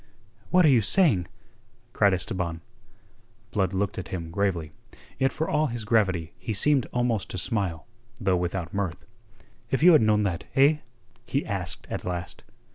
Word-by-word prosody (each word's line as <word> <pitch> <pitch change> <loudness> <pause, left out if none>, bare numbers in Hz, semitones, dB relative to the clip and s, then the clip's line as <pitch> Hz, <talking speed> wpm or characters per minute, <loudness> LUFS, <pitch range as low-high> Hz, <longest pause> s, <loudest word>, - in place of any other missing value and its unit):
"What 180 -1 +5
are - - +6
you 125 -5 +5
saying?" 105 - +4 0.7
cried 100 -4 +4
Esteban. 90 -3 -3 0.9
Blood 95 -4 0
looked 95 +1 -2
at 95 - -6
him 85 -3 -5
gravely. 85 -5 -1 0.5
Yet 135 0 +2
for 160 - -3
all 150 +1 +1
his 120 -3 -5
gravity 95 -7 +1
he 110 - -4
seemed 135 +5 +3
almost 120 -5 0
to - - -5
smile, 90 -4 -1 0.3
though 95 -3 +1
without 90 -1 -3
mirth. 100 -4 -3 0.6
"If 135 +4 0
you 180 - +9
had 155 - +6
known 105 -1 +3
that, 90 -4 -2
eh?" 145 +3 +5 0.5
he 140 - -1
asked 90 -5 -4
at - - -4
last. 90 -1 -5
100 Hz, 160 wpm, -26 LUFS, 90-125 Hz, 0.9 s, you